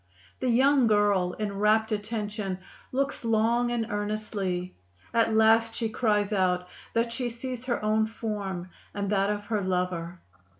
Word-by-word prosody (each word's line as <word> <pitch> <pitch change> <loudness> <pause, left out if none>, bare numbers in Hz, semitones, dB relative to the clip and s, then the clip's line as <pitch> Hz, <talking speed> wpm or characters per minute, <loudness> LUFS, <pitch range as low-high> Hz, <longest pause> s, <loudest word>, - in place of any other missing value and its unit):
The 255 - 0
young 265 +1 +4
girl, 205 -4 +3
in 200 -1 -4
rapt 215 +1 +3
attention, 210 -2 -3 0.3
looks 275 0 -1
long 230 +2 +2
and 235 -2 0
earnestly; 205 -3 -2 0.4
at 225 -1 +3
last 225 +1 +4
she 225 -2 -1
cries 210 -2 +1
out 180 -2 +1 0.3
that 230 0 +1
she 245 0 -2
sees 245 +1 -6
her 240 -4 -1
own 220 +1 +2
form 200 -5 -4 0.2
and 200 0 -2
that 200 -1 +2
of 205 0 -2
her 215 -1 -1
lover. 180 -2 -2
215 Hz, 145 wpm, -27 LUFS, 200-230 Hz, 0.4 s, young